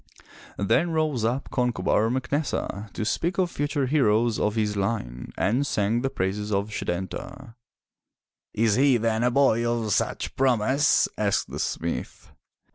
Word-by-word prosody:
Then 130 - +2
rose 155 -7 0
up 120 +5 -1
Concobar 115 -3 +1
MacNessa 130 -5 -2
to 110 - -3
speak 170 +10 -1
of 180 -2 +1
future 145 -1 -1
heroes 120 -5 +2
of 105 +1 0
his 105 -2 0
line 95 - -3
and 115 +9 +1
sang 110 -3 0
the 135 - 0
praises 105 0 -2
of 100 +1 -1
Setanta. 95 +8 -5 0.5
" - - -65
Is 110 -1 +3
he 135 +2 +4
then 115 0 0
a 125 - +4
boy 125 -3 +3
of 120 -3 0
such - - -1
promise? 130 +2 +3
*' - - -38
asked - - -1
the - - -5
smith. 85 0 -4
115 Hz, 150 wpm, -25 LUFS, 105-135 Hz, 0.5 s, he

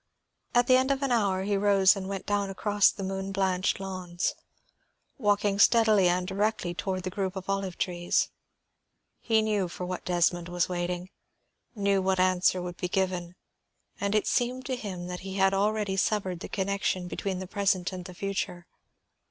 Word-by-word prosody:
At 245 0 +5
the 255 +1 +6
end 260 +1 +1
of 275 0 0
an 270 - 0
hour 200 -5 +2
he 200 +1 0
rose 195 0 +5
and 190 -1 -5
went 195 -1 -4
down 205 -1 0
across 205 +1 +3
the 195 - -6
moon 195 0 -3
blanched 190 -1 0
lawns, 185 -3 -3 0.9
walking 205 -2 +1
steadily 215 -4 +5
and 180 +1 +1
directly 200 -2 -1
toward 185 +1 -3
the 185 - -3
group 195 -1 -2
of 190 0 -6
olive 195 -2 -2
trees. 175 -1 0 0.9
He 220 -2 +2
knew 210 -4 0
for 180 +1 -6
what 180 0 -4
Desmond 175 0 +1
was 175 0 0
waiting, 180 +1 -3 0.6
knew 200 -2 +2
what 190 0 +1
answer 185 0 +3
would 175 -1 -6
be 180 - -3
given, 180 -2 -1 0.6
and 200 +1 0
it 215 - +2
seemed 250 +1 0
to 260 - -1
him 195 -7 -6
that 180 0 -5
he 190 0 -7
had 195 0 +3
already 205 0 +1
severed 190 -3 0
the - - -7
connection 195 -2 -1
between 190 +1 -3
the 185 - -5
present 190 -1 0
and 180 -1 -6
the 180 - -9
future. 190 -2 -3
190 Hz, 175 wpm, -28 LUFS, 180-205 Hz, 0.9 s, the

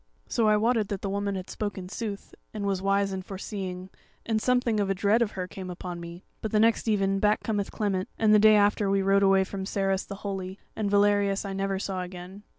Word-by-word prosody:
"So 225 -2 +1
I 210 0 +5
wotted 225 -1 +2
that 200 -2 -5
the 195 - -2
woman 200 0 -1
had 185 -1 -5
spoken 200 -3 -4
sooth, 205 0 -6 0.2
and 205 -1 -3
was 195 -2 0
wise 195 0 +1
and 190 -1 -4
foreseeing, 190 -1 -6 0.3
and 220 -1 0
something 245 -3 +2
of 200 -1 0
a 195 - +1
dread 205 +5 +2
of 220 -3 0
her 185 -1 -4
came 185 0 -8
upon 180 -1 -6
me. 170 +1 -9 0.2
But 220 - -2
the 215 - +3
next 225 +1 +3
even 195 -2 +2
back 210 +1 +2
cometh 205 -3 -1
Clement, 195 -4 -2
and 215 -1 +4
the 210 - +7
day 215 0 +7
after 205 0 +3
we 195 0 +2
rode 195 +1 +4
away 195 -1 +5
from 190 0 -5
Sarras 195 0 0
the 200 - -7
Holy, 190 -1 -4 0.2
and 210 -2 -1
Valerius 205 0 +2
I - - -4
saw - - -4
never 195 0 -1 0.3
again. 180 +2 -9
200 Hz, 230 wpm, -27 LUFS, 190-210 Hz, 0.3 s, the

